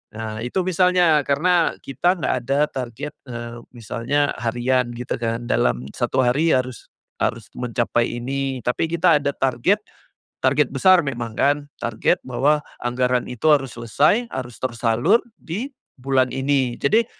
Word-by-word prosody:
Nah 110 Hz, -1 st, -5 dB
itu 125 Hz, +11 st, -1 dB
misalnya, 180 Hz, -3 st, +3 dB
karena 170 Hz, +4 st, +2 dB
kita 155 Hz, +8 st, +1 dB
nggak 175 Hz, -, -1 dB
ada 135 Hz, +3 st, +1 dB
target, 130 Hz, +3 st, -5 dB, 0.2 s
eee, 120 Hz, -1 st, -7 dB, 0.2 s
misalnya 120 Hz, +5 st, -1 dB
harian 120 Hz, +2 st, 0 dB
gitu 125 Hz, +1 st, -4 dB
kan, 115 Hz, 0 st, -2 dB
dalam 60 Hz, -, 0 dB
1 125 Hz, +1 st, 0 dB
hari 145 Hz, +7 st, +3 dB
harus 130 Hz, -1 st, -3 dB, 0.3 s
harus -, -, -1 dB
mencapai 120 Hz, -1 st, 0 dB
ini 135 Hz, +1 st, -2 dB
tapi 125 Hz, +6 st, 0 dB
kita 170 Hz, -2 st, +4 dB
ada 140 Hz, -, +1 dB
target, 135 Hz, -, +1 dB, 0.6 s
target -, -, +3 dB
besar 185 Hz, -2 st, +5 dB
memang 120 Hz, -4 st, -4 dB
kan 145 Hz, +1 st, +4 dB, 0.3 s
target 115 Hz, -2 st, +1 dB
bahwa 145 Hz, +4 st, +2 dB, 0.2 s
anggaran 125 Hz, 0 st, 0 dB
itu 125 Hz, +3 st, -7 dB
harus 135 Hz, -4 st, +3 dB
selesai, 145 Hz, -, +2 dB
harus 125 Hz, -3 st, -5 dB
tersalur, 120 Hz, -, +2 dB, 0.2 s
di 210 Hz, -, -5 dB, 0.3 s
bulan 130 Hz, 0 st, +1 dB
ini. 135 Hz, -2 st, +1 dB
Jadi, 220 Hz, +11 st, +3 dB
130 Hz, 140 wpm, -22 LUFS, 120-150 Hz, 0.6 s, besar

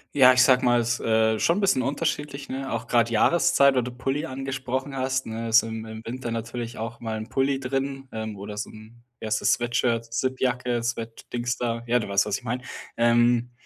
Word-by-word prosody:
Ja, 130 Hz, -2 st, +8 dB
ich 125 Hz, 0 st, +6 dB
sage 130 Hz, -1 st, +4 dB
mal, 120 Hz, -1 st, +4 dB
ist, 115 Hz, 0 st, -1 dB
äh, 110 Hz, -1 st, +2 dB
schon 170 Hz, -, +2 dB
'n -, -, -2 dB
bisschen 190 Hz, -10 st, +3 dB
unterschiedlich, 145 Hz, 0 st, -2 dB
ne? 135 Hz, 0 st, -4 dB
Auch 115 Hz, 0 st, -3 dB
grad 115 Hz, -1 st, +3 dB
Jahreszeit, 140 Hz, +2 st, +4 dB
weil 125 Hz, -, +2 dB
du 125 Hz, -, -5 dB
Pulli 135 Hz, +5 st, -2 dB
angesprochen 135 Hz, 0 st, -4 dB
hast, 130 Hz, 0 st, -1 dB
ne? 115 Hz, +1 st, -4 dB
Ist 115 Hz, +1 st, +5 dB
im 110 Hz, 0 st, -5 dB
im 110 Hz, 0 st, -8 dB
Winter 120 Hz, 0 st, -5 dB
natürlich 115 Hz, +1 st, -5 dB
auch 115 Hz, +1 st, -5 dB
mal 110 Hz, -1 st, -4 dB
'n 110 Hz, +1 st, -7 dB
Pulli 135 Hz, 0 st, 0 dB
drin, 135 Hz, +1 st, -3 dB
ähm, 110 Hz, -1 st, -5 dB
oder 100 Hz, +1 st, -8 dB
so 105 Hz, -, -4 dB
'n, 110 Hz, +2 st, -14 dB, 0.2 s
wie -, -, -5 dB
heißt 110 Hz, 0 st, 0 dB
das, -, -, +3 dB
Sweatshirt, 120 Hz, -1 st, 0 dB
Zippjacke, 125 Hz, -1 st, -1 dB
Sweat 115 Hz, -1 st, -5 dB
Dingsda, 120 Hz, -1 st, -2 dB
ja, 120 Hz, +1 st, +3 dB
du 105 Hz, -, -5 dB
weißt, 100 Hz, 0 st, +3 dB
was 105 Hz, -1 st, -1 dB
ich -, -, -23 dB
mein. 120 Hz, +1 st, -3 dB, 0.4 s
Ähm, 120 Hz, +1 st, +3 dB
120 Hz, 210 wpm, -25 LUFS, 115-130 Hz, 0.4 s, Ja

